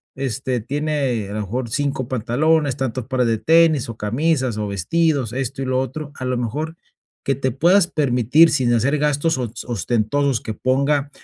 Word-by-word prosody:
este, 130 -2 -2
tiene 135 -4 -2
a - - -6
lo 105 - -2
mejor 120 +5 -4
5 135 0 -2
pantalones, 135 +4 +1
tantos 130 -3 -3
pares 130 -2 +1
de 115 -1 0
tenis, 160 -1 +3
o 115 - -7
camisas, 130 +2 0
o 105 -1 -2
vestidos, 130 - 0
esto 135 +1 -3
y - - -2
lo 130 0 0
otro, 140 +3 -4
a - - -7
lo 125 -1 -1
mejor, 150 +8 -3 0.5
que 135 - +2
te 130 0 -1
puedas 175 +8 +4
permitir 140 +1 +3
sin 130 -5 +1
hacer 135 +6 +1
gastos 150 +1 +1
os 120 -2 -5
ostentosos, 120 +4 0
que 110 - -5
ponga, 140 +4 0
130 Hz, 175 wpm, -20 LUFS, 120-145 Hz, 0.5 s, puedas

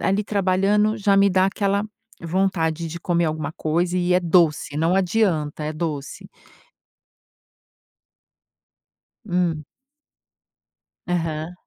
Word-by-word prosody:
ali 195 +2 +1
trabalhando 205 +2 +1
já 200 -2 +2
me 200 0 +5
dá 185 0 +3
aquela 200 0 0 0.4
vontade 170 -2 -1
de 170 +2 -7
comer 170 -1 0
alguma 155 -1 -3
coisa 170 +4 -1
e 180 0 +1
é 180 - +4
doce, 165 -4 +2
não 165 +4 +1
adianta, 175 -6 0
é 155 - -3
doce. 150 -3 -5 3.0
Hum. 175 -4 0 1.4
Aham. 165 -1 -2
175 Hz, 105 wpm, -22 LUFS, 160-195 Hz, 3.0 s, me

